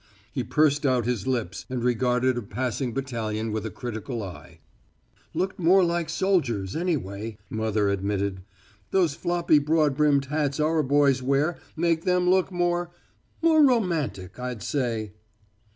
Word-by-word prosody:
He - - -1
pursed 150 -1 +2
out 130 -4 +2
his 120 -4 -2
lips 115 -8 -2
and 125 -2 -3
regarded 125 +1 +2
a 120 - -2
passing 125 +3 -3
battalion 115 -4 -3
with 110 0 -2
a - - -4
critical 115 +2 -5
eye. 95 -3 -10 0.8
"Looked 190 +1 -2
more 185 +2 +5
like 170 -1 0
soldiers, 120 - 0
anyway," 115 - -2
mother 110 -2 0
admitted. 100 -1 -1 0.5
"Those 175 -6 +2
floppy, 170 -1 +2
broad 150 -1 +2
brimmed 145 -2 +3
hats 145 0 -1
our 155 +1 +2
boys 140 -1 +3
wear 140 +6 +1 0.2
make 165 0 +1
them 180 -1 +2
look 190 0 +2
more 175 -1 0 0.5
more 320 -2 +6
romantic, 170 - 0
I'd 125 -3 -5
say." 115 -7 -2
135 Hz, 140 wpm, -26 LUFS, 110-165 Hz, 0.8 s, more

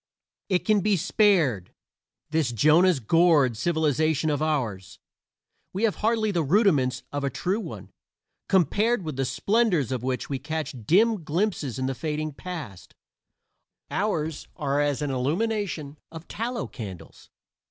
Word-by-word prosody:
It 185 -2 +1
can 215 -1 +3
be 205 0 +2
spared 160 - +2 0.6
this 155 -6 +1
Jonah's 155 - +4
gourd 150 -1 +3
civilization 155 +2 +1
of 145 0 -1
ours. 120 - -2 0.8
We 195 +4 -3
have 220 -3 +2
hardly 220 -1 +1
the 175 -4 0
rudiments 145 - +2
of 145 0 -3
a 140 - +1
true 185 +9 -2
one; - - -8 0.6
compared 205 +4 +2
with 155 -4 -5
the 135 0 -1
splendors 195 - +1
of 130 -3 -2
which 130 0 -2
we 135 -2 -3
catch 155 +1 -4
dim 210 +2 +3
glimpses 160 - -1
in 130 - -2
the 135 - -1
fading 155 +2 -3
past, 155 - -8 1.0
ours 160 -7 -2
are 145 -3 0
as 145 0 0
an 145 - -1
illumination 155 - -2
of 160 0 -10
tallow 235 +1 -3
candles. 100 -8 -10
155 Hz, 140 wpm, -25 LUFS, 135-195 Hz, 1.0 s, Jonah's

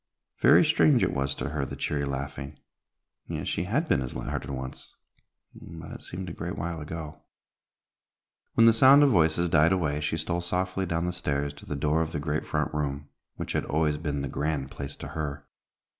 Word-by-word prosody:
Very - - +7
strange 150 -5 +4
it - - +1
was 70 0 -1
to - - -3
her 75 -1 -2
the - - -5
cheery 70 -1 -1
laughing, 70 +1 -5 0.7
yet - - -4
she 85 - -1
had 140 - 0
been 70 - +2
as 65 - -5
light - - -4
hearted 70 - -4
once, 65 -1 -7 0.6
but 80 -1 -10
it - - -8
seemed 90 +1 -6
a 85 - -5
great 85 +1 -5
while 85 -1 -3
ago. 80 0 -7 1.3
When 115 - +6
the 115 - +8
sound 135 +5 +7
of 140 - +5
voices 85 -2 +3
died 80 -1 +4
away, 75 -6 0
she 80 +2 -1
stole 85 +2 -1
softly 95 +2 -1
down 85 0 -1
the 90 - -1
stairs 70 -4 -2
to - - -13
the 75 - -3
door 75 +3 +1
of 80 0 -2
the 75 - -1
great 75 +1 -2
front - - -1
room, 75 -1 -3 0.3
which - - -5
had - - 0
always 75 0 +1
been 75 -3 -2
the - - -2
grand 70 0 -2
place 70 0 -6
to - - -8
her. 70 -2 -4
80 Hz, 205 wpm, -27 LUFS, 70-85 Hz, 1.3 s, the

